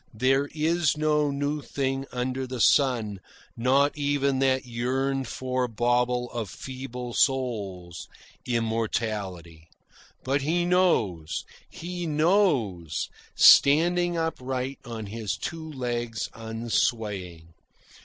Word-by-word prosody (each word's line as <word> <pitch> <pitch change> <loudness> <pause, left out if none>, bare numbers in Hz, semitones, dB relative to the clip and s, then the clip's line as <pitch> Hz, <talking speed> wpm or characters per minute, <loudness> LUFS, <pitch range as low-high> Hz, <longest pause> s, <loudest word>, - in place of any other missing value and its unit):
There 135 +5 +2
is 160 0 +1
no 150 -1 +2
new 145 +1 -2
thing 135 -1 -2
under 130 +1 -2
the 125 -1 -5
sun, 115 -6 +3 0.4
not 135 +4 +2
even 140 -2 0
that 130 -1 +2
yearned 130 +2 -1
for 130 0 -2
bauble 120 +1 0
of 115 -4 -4
feeble 125 -1 -7
souls 100 -11 -1 0.4
immortality. 110 -8 -2 0.6
But 135 +2 0
he 170 +5 +1
knows, 115 - +1 0.2
HE 175 0 -5
knows, 150 - +1 0.3
standing 175 +4 +6
upright 135 -4 -3
on 115 -3 -6
his 105 -1 -4
two 160 +3 -6
legs 120 -4 -3
unswaying. 110 -7 -2
130 Hz, 100 wpm, -26 LUFS, 115-145 Hz, 0.6 s, standing